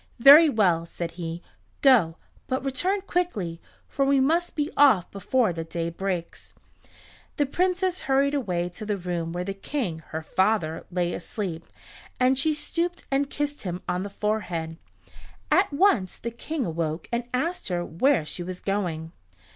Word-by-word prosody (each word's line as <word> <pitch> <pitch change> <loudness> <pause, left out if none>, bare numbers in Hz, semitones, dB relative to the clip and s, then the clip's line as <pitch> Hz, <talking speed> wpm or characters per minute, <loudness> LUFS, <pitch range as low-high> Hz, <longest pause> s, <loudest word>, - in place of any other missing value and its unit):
"Very 290 +6 +9
well," 180 - +2
said 170 0 -5
he. 170 0 -6 0.4
"Go, 220 - +5 0.3
but 260 0 -2
return 360 +10 0
quickly, 220 - -2 0.3
for 275 - 0
we 275 0 +3
must 330 +6 +1
be 295 +1 -1
off 265 -11 +5
before 210 +1 +1
the 165 0 -4
day 165 +1 -3
breaks." 180 -1 -4 0.8
The 290 - +3
Princess 365 +4 0
hurried 275 +1 +2
away 180 -11 -1
to 180 +4 -9
the 210 -1 -1
room 175 -2 -3
where 175 +1 -3
the 195 +2 -3
King, 195 - -3
her 160 0 -5
father, 185 -3 0
lay 175 -1 -1
asleep, 175 -3 -5 0.5
and 255 +1 +4
she 300 +4 +1
stooped 345 +3 -3
and 275 +1 +1
kissed 290 0 -3
him 180 -1 -5
on 180 - -1
the 200 - -4
forehead. 180 -6 -2 0.7
At 385 -2 +4
once 280 - +2
the 235 - -5
King 275 +3 -3
awoke 160 -1 -3
and 235 0 -1
asked 330 +8 -1
her 175 -2 -1
where 220 - +2
she 155 - -5
was 180 +1 -5
going. 175 -5 -2
205 Hz, 160 wpm, -26 LUFS, 170-280 Hz, 0.8 s, Very